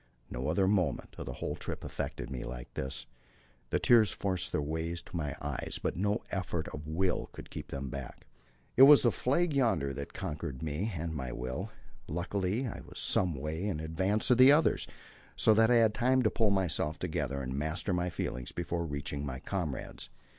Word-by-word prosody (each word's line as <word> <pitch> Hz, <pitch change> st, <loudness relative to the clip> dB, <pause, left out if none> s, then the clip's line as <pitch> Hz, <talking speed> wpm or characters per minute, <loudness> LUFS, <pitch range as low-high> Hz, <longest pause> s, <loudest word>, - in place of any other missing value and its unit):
No 65 Hz, +3 st, -3 dB
other 95 Hz, +5 st, +2 dB
moment 95 Hz, -7 st, +1 dB
of -, -, -6 dB
the -, -, -4 dB
whole -, -, -3 dB
trip -, -, -6 dB
affected -, -, -4 dB
me 65 Hz, -2 st, -4 dB
like -, -, -7 dB
this. 65 Hz, -1 st, -4 dB, 0.6 s
The -, -, +2 dB
tears 115 Hz, -3 st, +5 dB
forced 95 Hz, -3 st, -1 dB
their -, -, 0 dB
way 80 Hz, +3 st, -2 dB
to 90 Hz, +2 st, -10 dB
my 75 Hz, -5 st, -2 dB
eyes; -, -, -3 dB
by -, -, -1 dB
no 105 Hz, +4 st, 0 dB
effort 90 Hz, -4 st, -2 dB
of 75 Hz, 0 st, -8 dB
will 90 Hz, +4 st, 0 dB
could -, -, -9 dB
I -, -, -11 dB
keep -, -, -6 dB
them 70 Hz, -1 st, -5 dB
back. 70 Hz, -2 st, -7 dB, 0.5 s
It -, -, +5 dB
was 150 Hz, -, +9 dB
the 120 Hz, -, +5 dB
flag 155 Hz, +9 st, +1 dB
yonder 110 Hz, -, +2 dB
that 70 Hz, +2 st, -6 dB
conquered 70 Hz, -3 st, -4 dB
me 80 Hz, +8 st, -2 dB
and 80 Hz, 0 st, -3 dB
my 65 Hz, -5 st, -4 dB
will. 65 Hz, +1 st, -4 dB, 0.4 s
Luckily 95 Hz, -, -1 dB
I 120 Hz, -, -5 dB
was -, -, -12 dB
some 90 Hz, -4 st, +2 dB
way 75 Hz, +5 st, -3 dB
in 95 Hz, -7 st, -1 dB
advance 95 Hz, +9 st, 0 dB
of 125 Hz, -, +5 dB
the 130 Hz, +2 st, +10 dB
others, 150 Hz, +2 st, +3 dB, 0.5 s
so 110 Hz, -, +5 dB
that 110 Hz, +1 st, +5 dB
I 125 Hz, -, +5 dB
had 115 Hz, -2 st, +5 dB
time 130 Hz, +2 st, +3 dB
to 110 Hz, -, +3 dB
pull 110 Hz, -3 st, +2 dB
myself 85 Hz, -5 st, 0 dB
together 70 Hz, +1 st, -2 dB
and 65 Hz, 0 st, -3 dB
master 80 Hz, +7 st, -1 dB
my 90 Hz, 0 st, 0 dB
feelings 65 Hz, -6 st, -4 dB
before 85 Hz, 0 st, -2 dB
reaching 70 Hz, -1 st, -3 dB
my 65 Hz, -3 st, -4 dB
comrades. 80 Hz, -8 st, -4 dB
85 Hz, 195 wpm, -31 LUFS, 70-105 Hz, 0.6 s, the